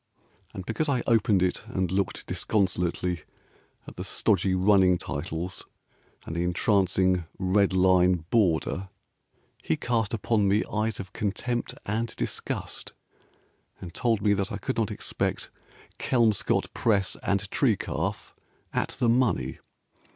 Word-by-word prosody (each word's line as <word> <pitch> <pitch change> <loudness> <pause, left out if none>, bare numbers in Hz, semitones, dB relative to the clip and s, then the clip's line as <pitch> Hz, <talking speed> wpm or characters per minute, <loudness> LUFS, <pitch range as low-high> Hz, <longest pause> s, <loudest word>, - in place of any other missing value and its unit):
And 95 - -6
because 145 +9 -1
I 130 -3 +1
opened 105 -5 +3
it, 90 - 0
And 95 -6 -1
looked 95 +1 -1
disconsolately 90 -3 0 0.6
at - - -11
the - - -4
stodgy 95 -1 +1
running 95 -1 +4
titles 80 +4 -5 0.6
And 80 - -5
the 85 - 0
entrancing 95 -1 +2
red 95 +1 +2
line 90 -2 +4
border, 95 -2 +1 0.7
He - - 0
cast 115 -4 0
upon 110 -2 +1
me 100 +2 +3
eyes 110 0 0
of 95 -2 -7
contempt 120 +4 -2
and 110 +2 -2
disgust, - - -4 0.9
And 85 -2 -8
told 115 -4 0
me 105 -1 +4
that 100 -1 -1
I 100 - -3
could 130 +6 -3
not 115 -2 +1
expect 105 - -3 0.5
Kelmscott 115 -6 +1
Press 100 -5 +1
and 100 +1 0
tree 120 -8 +3
calf - - -3 0.4
At - - -1
the 120 - +1
money. 120 +1 +1
100 Hz, 130 wpm, -27 LUFS, 90-110 Hz, 0.9 s, running